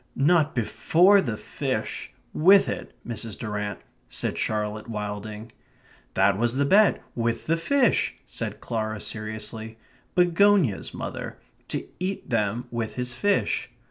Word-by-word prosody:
"Not 155 +2 +3
BEFORE 165 - +4
the 115 - -3
fish - - -3 0.2
with 190 +5 +6
it, - - -5
Mrs. 115 -2 -4
Durrant," 105 -2 -4 0.3
said - - -2
Charlotte 105 0 -2
Wilding. 105 +1 -5 0.6
"That 95 +1 +3
was 120 +1 +2
the 140 +1 +2
bet; 200 +7 +4
with 115 -1 -1
the 165 - +2
fish," 245 +10 +2
said - - -5
Clara 110 -2 -2
seriously. 110 +1 -4 0.4
"Begonias, 180 - +3
mother. - - -5 0.3
To - - -3
eat 185 +2 -3
them 115 +1 0
with 115 -2 -3
his 125 -1 -2
fish." 200 +11 0
115 Hz, 125 wpm, -26 LUFS, 110-165 Hz, 0.6 s, with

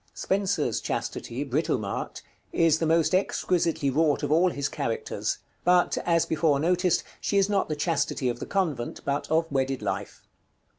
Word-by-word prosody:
Spenser's 190 - 0
Chastity, 125 +4 -3
Britomart, 125 -7 -2 0.3
is 160 -1 +3
the 165 - 0
most 165 +2 +3
exquisitely 170 -6 +1
wrought 150 +1 +2
of - - -1
all 170 +4 +4
his 140 -4 -2
characters; 140 -7 -2 0.3
but, 180 0 +3
as 170 -1 +3
before 155 -3 +2
noticed, 180 +2 +2 0.2
she 200 - 0
is 195 0 +3
not 200 -4 +1
the 155 - -1
Chastity 145 -3 0
of 120 -1 -2
the - - -6
convent, 160 -12 -2
but 140 +1 -1
of 160 +1 +2
wedded 135 -1 -1
life. - - -4
160 Hz, 155 wpm, -26 LUFS, 140-180 Hz, 0.3 s, all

